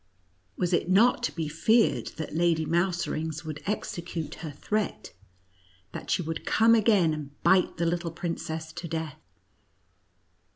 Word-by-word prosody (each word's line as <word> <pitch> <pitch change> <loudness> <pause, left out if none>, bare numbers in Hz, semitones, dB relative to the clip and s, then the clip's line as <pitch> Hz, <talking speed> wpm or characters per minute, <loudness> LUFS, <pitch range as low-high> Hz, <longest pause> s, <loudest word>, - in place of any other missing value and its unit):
Was 180 0 0
it 175 - +1
not 225 +7 +5
to 240 - 0
be 165 -3 -3
feared 220 +9 +2
that 160 -3 -5
Lady 165 -1 +2
Mouserings 170 -2 -1
would 155 -2 -6
execute 170 -6 -3
her 160 - -5
threat, 210 +9 -3 0.8
that - - -8
she 180 - +1
would 160 0 -4
come 225 +1 +4
again, 210 -7 +4
and 145 -2 -8
bite 190 -1 +4
the 170 - 0
little 170 0 -1
princess 160 -1 -4
to 175 0 -6
death 160 -2 -4
170 Hz, 140 wpm, -27 LUFS, 160-185 Hz, 0.8 s, not